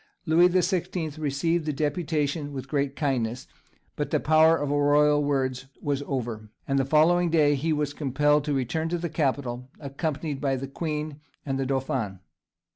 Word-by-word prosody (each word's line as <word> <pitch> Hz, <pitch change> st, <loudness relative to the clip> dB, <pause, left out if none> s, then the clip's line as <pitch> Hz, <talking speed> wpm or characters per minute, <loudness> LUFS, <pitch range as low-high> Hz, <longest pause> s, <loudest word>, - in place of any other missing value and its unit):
Louis 170 Hz, +2 st, +5 dB
the 180 Hz, 0 st, +2 dB
Sixteenth 175 Hz, -4 st, -2 dB
received 155 Hz, +3 st, 0 dB
the -, -, +1 dB
deputation 150 Hz, 0 st, -1 dB
with 130 Hz, -1 st, -6 dB
great 140 Hz, -1 st, -1 dB
kindness, 125 Hz, -5 st, -1 dB, 0.5 s
but -, -, -2 dB
the -, -, +1 dB
power 160 Hz, +1 st, +5 dB
of 145 Hz, -2 st, -2 dB
royal 145 Hz, 0 st, +4 dB
words 135 Hz, -2 st, -1 dB
was 140 Hz, -1 st, -1 dB
over, 115 Hz, -5 st, -4 dB, 0.2 s
and 135 Hz, 0 st, +1 dB
the 135 Hz, -, +1 dB
following 170 Hz, +5 st, +4 dB
day 150 Hz, -3 st, +4 dB
he 150 Hz, +4 st, -1 dB
was 150 Hz, -2 st, -1 dB
compelled 145 Hz, +1 st, +2 dB
to 150 Hz, -, 0 dB
return 150 Hz, +5 st, -1 dB
to 175 Hz, -, -1 dB
the 170 Hz, 0 st, -3 dB
capital, 130 Hz, -5 st, -2 dB
accompanied 145 Hz, 0 st, -3 dB
by 135 Hz, -2 st, +1 dB
the 135 Hz, +1 st, -4 dB
Queen 150 Hz, 0 st, -4 dB, 0.3 s
and 135 Hz, -2 st, -2 dB
the 135 Hz, -, -1 dB
dauphin. 130 Hz, -7 st, -2 dB
145 Hz, 170 wpm, -26 LUFS, 135-155 Hz, 0.5 s, Louis